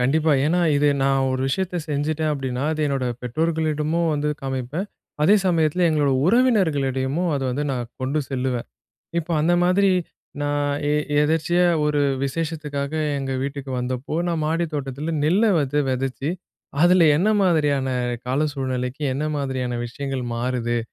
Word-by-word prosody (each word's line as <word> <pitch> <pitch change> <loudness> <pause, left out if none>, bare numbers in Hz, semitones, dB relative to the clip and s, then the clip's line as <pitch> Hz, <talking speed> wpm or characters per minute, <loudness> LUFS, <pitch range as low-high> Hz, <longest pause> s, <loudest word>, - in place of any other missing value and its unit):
கண்டிப்பா. 155 +5 +2
ஏன்னா, 175 +3 +2 0.2
இது 145 +1 +3
நான் 135 0 +2
ஒரு 130 - -1
விஷயத்த 180 +5 -1
செஞ்சுட்டேன் 155 +1 -1
அப்டீன்னா, 135 -2 -3
அது 155 - -3
என்னோட 135 -2 -1 0.2
பெற்றோர்களிடமும் 160 +4 0
வந்து 150 0 -1
காமிப்பேன். 135 +8 -3 0.4
அதே 195 +7 +6
சமயத்தில 170 0 +2
எங்களோட 150 -3 +2 0.2
உறவினர்களிடயமும் 165 - +2
அதை 135 -1 -2
வந்து 140 +4 -2
நான் 120 -3 -3
கொண்டு 135 +4 -1
செல்லுவேன். 130 -2 -2 0.5
இப்ப 170 +1 -8
அந்த 170 +3 +3
மாதிரி 190 +2 +3 0.5
நான் 145 0 0 0.2
எ - - +2 0.3
எதர்ச்சியா 165 +3 +2 0.2
ஒரு 150 -1 +1 0.2
விசேஷத்துக்காக 150 -1 -3 0.2
எங்க 135 -1 -3
வீட்டுக்கு 140 -1 -5
வந்தப்போ, 130 +4 -3
"நான் 165 -2 -1
மாடி 165 +2 0
தோட்டத்தில 145 +3 -3
நெல்ல 185 +9 +3
வந்து 145 0 -1
வெதைச்சு, 135 +3 -2 0.5
அதில 175 -1 +6
என்ன 200 +6 +2
மாதிரியான 150 -7 +2 0.4
கால 130 +3 0
சூழ்நிலைக்கு, 130 0 -3
என்ன 140 +3 -2
மாதிரியான 130 -3 -2
விஷயங்கள் 135 +1 -4
மாறுது?" 120 -1 -1
145 Hz, 140 wpm, -23 LUFS, 130-160 Hz, 0.5 s, அதே